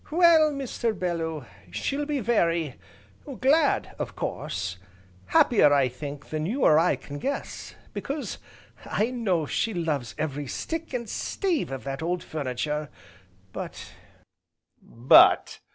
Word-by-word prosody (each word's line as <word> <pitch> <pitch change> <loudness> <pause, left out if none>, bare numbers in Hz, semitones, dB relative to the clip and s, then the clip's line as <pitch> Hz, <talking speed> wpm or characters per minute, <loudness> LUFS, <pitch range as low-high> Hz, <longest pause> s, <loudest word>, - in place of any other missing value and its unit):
"Well, 320 -2 +5
Mr. 245 -6 -2
Bellew, 165 -5 -2 0.2
she'll 280 - -2
be 290 -3 -1
very 170 - +1 0.7
glad, 285 +3 +2
of - - -4
course, 90 0 -4 0.5
happier 205 -11 +5
I 140 -3 +4
think, 140 +3 -8
than 155 0 -2
you 250 +7 -1
or 155 - +6
I 170 - +3
can 145 0 -9
guess, 275 - -4 0.2
because 285 +1 -4 0.4
I 225 +4 -1
know 195 -10 0
she 220 +8 -1
loves 150 -10 -2
every 145 -2 -3
stick, 325 - -4
and 235 -2 -3
stave 345 - -1
of 135 - -5
that 135 +1 -4
old 175 +2 -2
furniture, 150 +1 -3 0.6
but - - -7 0.6
" - - -49
"But!" 120 +3 +5
170 Hz, 130 wpm, -26 LUFS, -, 0.7 s, or